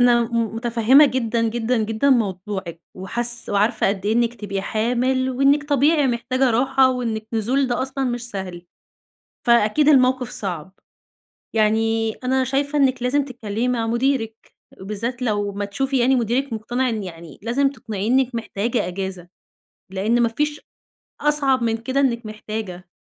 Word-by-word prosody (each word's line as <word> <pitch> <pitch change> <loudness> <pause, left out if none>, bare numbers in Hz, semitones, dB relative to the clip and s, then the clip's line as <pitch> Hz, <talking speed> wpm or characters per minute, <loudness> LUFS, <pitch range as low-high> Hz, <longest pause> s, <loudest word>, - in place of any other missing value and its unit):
أنا 240 -1 +5
م 230 -1 -2
مُتفهّمة 240 +5 +5
جدًا، 230 -3 0
جدًا، 240 +2 -1
جدًا 225 +6 +1
موضوعِك 190 -6 -1
وحاس 235 +5 -2
وعارفة 210 +1 +2
قد 200 0 -2
إيه 215 - +2
إنِّك 235 0 +1
تبقي 200 -3 -4
حامِل 250 +5 0
وإنِّك 275 +3 +3
طبيعي 290 +1 +3
محتاجة 255 +2 0
راحة 260 +2 +3
وإنِّك 225 -4 -3
نزول 250 +5 +1
ده 240 0 -1
أصلًا 270 0 -3
مش 240 -1 -3
سهل. 180 -3 -6 0.8
فأكيد 235 +5 +4
الموقف 255 -3 +3
صعب. 190 -8 -5 0.8
يعني 225 +1 +1
أنا 260 +2 0
شايفة 280 +3 -1
إنِّك 260 -3 +2
لازم 275 +3 +1
تتكلّمي 240 -2 -3
مع 235 -2 0
مُديرِك 235 -1 -1 0.3
وبالذات 225 +6 -4
لو 205 -4 -1
ما 205 +1 -3
تشوفي 265 +7 -1
يعني 260 +2 +3
مُديرِك 245 +2 0
مقتنع 240 +4 -1
إن 220 -3 -2
يعني 165 -4 -10
لازم 270 +5 +1
تقنعيه 215 -6 -5
إنِّك 260 -1 +2
محتاجة 230 -1 -2
أجازة، 185 -1 -5 0.6
لإن 215 +5 +1
ما 230 - +3
فيش 295 +5 -2 0.6
أصعب 275 -4 +2
من 225 0 0
كده 260 +4 -2
إنِّك 235 -4 +1
محتاجة. 215 -4 -6
235 Hz, 150 wpm, -21 LUFS, 215-260 Hz, 0.8 s, أنا